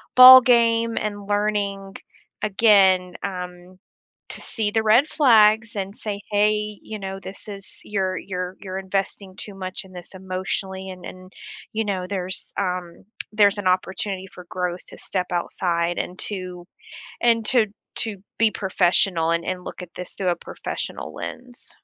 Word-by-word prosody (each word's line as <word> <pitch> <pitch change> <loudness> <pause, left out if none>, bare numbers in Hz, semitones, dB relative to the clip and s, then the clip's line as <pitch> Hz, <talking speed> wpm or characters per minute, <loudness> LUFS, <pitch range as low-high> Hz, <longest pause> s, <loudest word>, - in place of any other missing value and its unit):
ballgame 235 -3 +8
and 205 -1 -4
learning, 205 -1 -1 0.5
again, 195 -4 +4
um, 180 -1 -6 0.5
to - - -6
see 220 -3 -1
the 220 0 +1
red 230 +7 +5
flags 220 -7 +4
and 195 0 -4
say, 205 -2 -5
"Hey, 210 0 +1
you 215 -1 -7
know, 195 0 -5
this 195 +2 -9
is 195 -2 -8
you're 190 -2 -1
you're 180 -1 -5
you're 190 -1 -6
investing 195 0 -3
too 205 - -7
much 185 0 -5
in 190 - -16
this 175 +1 -9
emotionally 190 0 -3
and 185 -1 -9
and, 185 0 -10 0.4
you 220 0 -1
know, 190 -3 -2
there's 185 -1 -2
um, 180 -3 -3 0.3
there's 205 -1 +4
an 190 - -1
opportunity 190 +1 -1
for 180 - -12
growth 180 -1 -3
to - - -12
step 185 -2 -2
outside 175 0 -1
and 180 - -4
to 185 -3 -4 0.6
and 230 -2 +3
to 240 -4 +4 0.3
to 220 -3 -1 0.2
be 225 -1 +4
professional 180 -3 +2
and 170 0 +1
and 185 -1 -3
look - - -8
at 180 - -10
this 180 - -6
through 190 - -3
a 175 - +2
professional - - -6
lens." 245 -1 -8
195 Hz, 155 wpm, -23 LUFS, 185-210 Hz, 0.6 s, ballgame